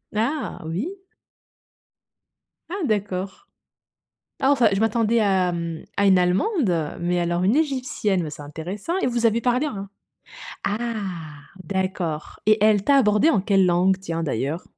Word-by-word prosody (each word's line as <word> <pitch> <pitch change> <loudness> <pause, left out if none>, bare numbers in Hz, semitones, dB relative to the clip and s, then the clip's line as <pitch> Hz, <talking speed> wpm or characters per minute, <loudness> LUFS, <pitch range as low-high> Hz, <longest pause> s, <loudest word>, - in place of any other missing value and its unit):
Ah! 265 +8 -2
Oui. 245 - -4 1.7
Ah 380 -2 -3
d'accord. 195 -4 -3 0.9
Ah 270 0 +2
enfin, 250 -6 +4
je 195 - 0
m'attendais 225 +1 +2
à, 190 -4 +2
mmh, 170 -2 -4
à 200 - +3
une 190 -1 +6
allemande, 180 - +1
mais 175 +1 0
alors 175 +1 0
une 200 +7 +3
égyptienne, 255 - 0
bah, 155 - -4
c'est 150 - -9
intéressant 180 - -5
et - - 0
vous 235 -1 0
avez 230 +1 +1
parlé 250 +5 +1
un 200 -7 -6 0.8
ah 205 +2 0 0.9
d'accord. 185 -3 -3
Et 215 -1 +4
elle 210 -2 +4
t'a 280 - +4
abordé 210 +4 +4
en 200 - +2
quelle 195 -1 +3
langue, 180 +2 +3
tiens 165 -3 -4
d'ailleurs? 145 +3 -2
200 Hz, 145 wpm, -23 LUFS, 175-235 Hz, 1.7 s, une